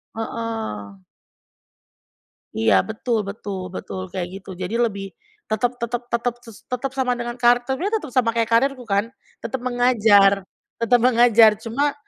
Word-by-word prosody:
Heeh. 220 - -5 1.6
Iya, 105 -4 +4
betul 220 0 -2
betul 195 -3 -6
betul 95 -1 -6
kayak 180 -2 -3
gitu 195 - -16
jadi 185 +5 -3
lebih 200 -5 -2 0.3
tetep 220 +3 0
tetep 240 +1 -3
tetep 235 0 0
tes 230 -3 -12 0.2
tetep 250 +2 -2
sama 260 -2 0
dengan 240 0 -4
karakternya, 245 +8 +2
tetep 310 - -4
sama 245 -2 +2
kayak 230 -1 +1
karirku 255 +2 +2
kan? 200 -1 0 0.3
Tetep 265 - -4
mengajar 220 -6 +4 0.4
tetep 240 +2 +4
mengajar 235 -2 +6
cuma, 280 +6 0
230 Hz, 135 wpm, -22 LUFS, 200-245 Hz, 1.6 s, mengajar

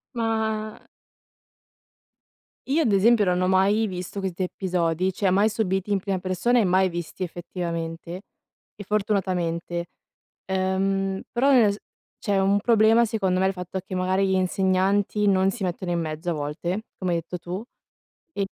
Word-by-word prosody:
Ma 220 -1 -1 1.9
io 300 +5 +2
ad 235 - +2
esempio 215 +2 +4
non 180 -1 +1
ho 185 - +2
mai 195 +4 +3
visto 185 0 -5
questi 190 -2 -4
episodi, 180 -1 -1
cioè 195 +1 +1
mai 200 +4 +3
subiti 195 -2 -1
in 200 - +2
prima 195 -1 -2
persona 185 +7 +1
e - - +4
mai 185 +1 +3
visti 175 +2 -6
effettivamente 170 0 -5 0.5
e 205 - -8
fortunatamente. 180 -4 -1 0.6
Ehm, 190 +1 0
però 270 +4 +3
nel 220 -6 +5
s - - -8 0.4
cioè 200 -2 0
un 200 +1 +3
problema 225 +1 +4
secondo 190 -4 0
è 190 - +3
il 190 - 0
fatto 180 0 -5
che - - -8
magari 185 +1 +1
gli 190 - +1
insegnanti 190 +2 +1
non 190 0 +3
si 225 -2 -6
mettono 180 0 -3
in 170 - 0
mezzo 160 +2 -3
a - - 0
volte, 165 +7 -3
come 185 -2 -2
hai 170 - +2
detto 180 +2 -6
tu, 180 +4 -5 0.7
e 200 -1 -1
190 Hz, 160 wpm, -24 LUFS, 180-205 Hz, 1.9 s, nel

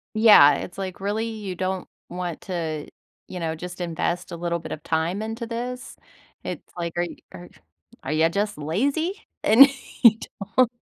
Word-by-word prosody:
Yeah, 210 -10 +8
it's 180 - -7
like, 190 -2 -5
"Really? 210 +3 -1
You 215 -5 -5
don't 185 +1 -3 0.2
want 175 -2 -5
to, 160 -5 -4 0.4
you 180 - -6
know, 160 -1 -2
just 180 +2 -8
invest 175 0 -2
a - - -4
little 170 0 -2
bit - - -9
of 155 - -6
time 165 +6 -1
into 225 +2 -5
this?" 245 +2 -5 0.5
It's - - -5
like, 170 -1 -3
"Are 175 - +1 0.2
are 90 0 -11 0.5
are 135 - -3
ya 160 +1 +3
just 205 +4 -1
lazy? 280 - -1 0.2
And 240 +6 +9 0.4
you 225 -2 +8 0.4
don't" 255 -2 +5
180 Hz, 165 wpm, -24 LUFS, 165-220 Hz, 0.5 s, And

